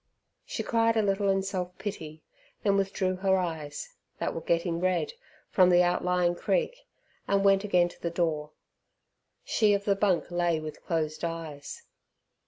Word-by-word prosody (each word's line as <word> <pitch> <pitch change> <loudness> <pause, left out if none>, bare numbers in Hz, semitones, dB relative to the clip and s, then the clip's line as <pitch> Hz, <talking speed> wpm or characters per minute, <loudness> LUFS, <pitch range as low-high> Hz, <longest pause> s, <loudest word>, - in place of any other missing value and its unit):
She - - -3
cried 230 -1 +2
a 220 - +3
little 200 0 +1
in 195 0 +2
self 180 -2 -4
pity, 160 -6 -6 0.4
then 200 -2 +3
withdrew 190 -1 0
her 190 0 +2
eyes, 160 -5 -4 0.2
that - - -2
were - - -4
getting 170 0 0
red, 185 - 0 0.4
from 185 -2 +5
the 175 0 +6
outlying 180 0 +2
creek, - - -1 0.4
and 200 0 +2
went 195 0 +5
again 180 -4 +3
to - - -17
the 170 - -1
door. 160 -3 -1 0.9
She 210 -2 +3
of 200 0 -3
the 200 - +3
bunk 190 -4 +1
lay 175 -2 +1
with 155 -1 -8
closed 155 -2 -2
eyes. 160 -4 -5
180 Hz, 160 wpm, -28 LUFS, 165-195 Hz, 0.9 s, the